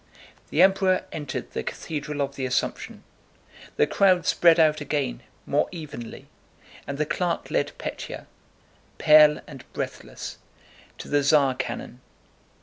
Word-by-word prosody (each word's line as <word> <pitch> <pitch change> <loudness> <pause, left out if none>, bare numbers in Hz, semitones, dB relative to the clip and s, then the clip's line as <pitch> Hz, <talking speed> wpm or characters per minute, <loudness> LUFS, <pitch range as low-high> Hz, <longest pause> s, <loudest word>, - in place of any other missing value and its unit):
The 165 - +4
Emperor 190 -1 +3
entered 150 -3 -5
the - - -3
Cathedral 150 -2 -5
of 140 0 -5
the 130 -2 -2
Assumption. 125 - -3 0.7
The - - +4
crowd 185 -3 +3
spread 170 -1 +5
out 155 -1 +4
again 145 - -2 0.2
more - - +1
evenly, 150 -9 -8 0.6
and 140 - -4
the 155 - 0
clerk 175 +3 -2
led - - 0
Pétya—pale 150 -1 +1
and - - -13
breathless—to - - -9
the 145 0 +2
Tsar 140 -2 +4
cannon. 130 -1 -6
150 Hz, 120 wpm, -25 LUFS, 140-165 Hz, 0.7 s, spread